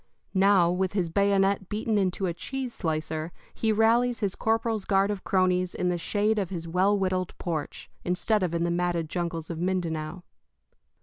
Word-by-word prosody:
Now, 190 -3 +4
with 185 +1 -1
his 180 -5 -1
bayonet 200 0 +2
beaten 215 +1 -1
into 190 0 0
a 175 - -1
cheese 260 +7 -5
slicer, 160 -1 -2 0.2
he 225 - 0
rallies 230 +3 +3
his 200 -4 -1
corporal's 225 -1 0
guard 195 +1 +2
of 200 -2 -5
cronies 185 -1 +1
in 180 - 0
the 175 - 0
shade 210 +4 +1
of 190 -4 -2
his 170 -3 -5
well 190 +5 +2
whittled 185 -2 -1
porch, 160 -4 -4 0.2
instead 185 +4 +1
of 175 -2 -1
in 170 - 0
the 170 - 0
matted 170 -2 0
jungles 170 -2 -3
of 165 - -5
Mindanao. 175 -2 -2
185 Hz, 175 wpm, -27 LUFS, 170-205 Hz, 0.2 s, Now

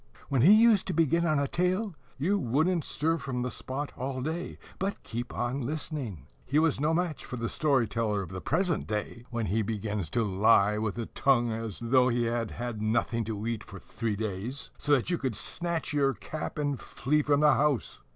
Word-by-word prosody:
When 135 -4 +2
he 170 +10 +8
used 220 -2 +6
to 185 - -1
begin 165 +1 +2
on 155 -2 +2
a 140 0 +1
tale, 185 +6 0 0.2
you 190 +9 +1
wouldn't 155 +7 +1
stir 160 +4 0
from 130 -3 -3
the 125 - -2
spot 135 +5 -4
all 130 0 -3
day, 160 +4 -3 0.2
but 195 +2 -2
keep 120 +1 -5
on 120 +3 -2
listening. 130 - -4 0.2
He 145 - 0
was 160 -3 +3
no 150 +3 +2
match 170 -2 -1
for - - -6
the 115 0 -2
story 135 -4 +2
teller 105 -1 -1
of 90 - -9
the 95 0 -5
present 175 +1 0
day, 110 +3 -4
when 115 -2 -2
he 105 +4 +1
begins 105 -4 -2
to 115 - +4
lie, 105 +1 +4
with 110 0 -2
a 115 - -2
tongue 120 -2 +2
as 110 -2 -4
though 125 +2 +4
he 120 -1 +1
had 115 -1 -1
had 120 -3 -5
nothing 115 +1 +1
to 110 -1 -4
eat 115 -2 -2
for 100 - -10
three 110 +3 -3
days, 110 +5 -4
so 145 - +1
that 140 +5 +2
you 175 - 0
snatch 170 - -3
your 140 -2 +2
cap 155 0 -6
and 145 -3 -1
flee 150 +3 0
from 145 0 +2
the 150 0 +6
house. 140 - +1
130 Hz, 205 wpm, -29 LUFS, 115-155 Hz, 0.2 s, he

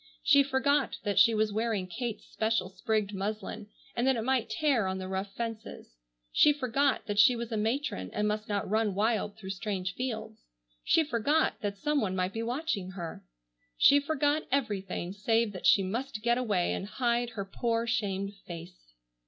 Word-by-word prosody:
She 280 - +6
forgot 280 0 +1
that 205 -2 +1
she 230 -1 +6
was 215 -1 +1
wearing 220 -3 0
Kate's 225 +5 -5
special 220 -4 -1
sprigged 215 0 -1
muslin, 210 +2 -4 0.3
and 240 +2 +1
that 265 - +4
it 225 - -2
might 255 -1 +1
tear 275 -10 +1
on 190 0 -2
the 185 0 -5
rough 190 +1 -3
fences. 225 - -6 0.4
She 300 - +6
forgot 275 0 0
that 205 -2 -1
she 245 +4 +7
was 235 0 -5
a - - -1
matron 220 - -1
and 210 0 0
must 210 +1 -2
not 205 -1 -1
run 215 -1 +1
wild 210 0 0
through 190 -3 -6
strange 195 -2 -3
fields. 220 -2 -4 0.4
She 325 - +4
forgot 290 +3 +1
that 200 -1 -3
some 295 +7 0
one 190 -4 -1
might 185 0 -1
be 225 - -3
watching 235 - -2
her. 175 -3 -7 0.5
She 285 - +7
forgot 295 +1 +1
everything 195 -8 -1
save 225 +2 +1
that 185 - -2
she 195 - +6
must 215 +2 -4
get 240 +1 +2
away 205 -8 +1
and 195 - -4
hide 240 +1 0
her 200 - -2
poor 230 +3 -1
shamed 200 -4 -1
face. 170 - -10
220 Hz, 180 wpm, -30 LUFS, 195-245 Hz, 0.5 s, she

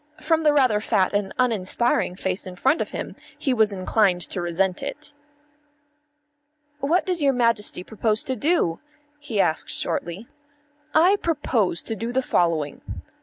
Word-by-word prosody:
From 320 +1 +1
the 305 -1 +4
rather 255 -7 +3
fat 205 -4 +1
and 200 -1 -1
uninspiring 230 -4 +1
face 190 0 -3
in 185 - -8
front 270 - +2
of - - -3
him - - -6 0.2
he 270 - 0
was 220 -3 +3
inclined 190 -1 +1
to 175 - -1
resent 175 +2 0
it. 295 0 -6 1.7
"What 315 +6 +1
does 360 -3 0
your 275 -1 +3
Majesty 230 -6 +1
propose 220 +1 0
to 260 - -2
do?" 280 - +1 0.4
he 245 -8 -4
asked 160 -4 +1
shortly. 175 +7 -3 0.7
"I 360 +6 +5
propose 260 - -1
to 225 - -4
do 230 +3 -4
the 260 +1 0
following. 165 - 0
220 Hz, 150 wpm, -23 LUFS, 185-280 Hz, 1.7 s, I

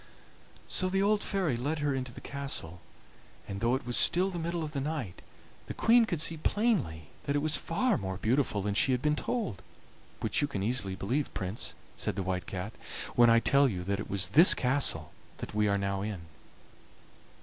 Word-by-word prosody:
"So 185 - 0
the 195 +1 +1
old 205 0 +2
fairy 185 -10 0
led 145 +7 -2
her 145 -2 0
into 130 -2 -4
the - - -11
castle, 135 - -3 0.7
and, 100 0 -6
though 120 +2 +2
it 130 - -5
was 120 0 0
still 185 +3 +4
the 175 - -4
middle 170 0 -3
of 150 - -5
the 140 -2 -3
night, 140 - -4 0.5
the - - -6
Queen 235 +1 +4
could 175 -7 -3
see 160 +1 +2
plainly 155 - -1 0.2
that 140 - -1
it 145 - +1
was 155 -1 0
far 205 +8 0
more 95 -1 -4
beautiful 110 -2 0
than 105 0 -1
she 130 +5 +2
had 125 - -2
been 150 0 +2
told, 200 - -3 0.6
which - - 0
you 145 - +1
can 100 -9 -4
easily 105 -4 +1
believe, 125 +10 -2
Prince," 95 +3 -2 0.2
said - - -3
the 95 - -2
White 90 0 -3
Cat, 95 +3 -5 0.4
"when 120 -1 +6
I 115 0 +6
tell 140 +3 +3
you 90 -5 -4
that 100 +1 -2
it - - -6
was 95 -2 +1
this 165 +5 +9
castle 125 - +1 0.3
that - - -7
we 105 0 +1
are 100 0 +2
now 100 0 -2
in. 100 -3 -4
130 Hz, 205 wpm, -30 LUFS, 100-155 Hz, 0.7 s, this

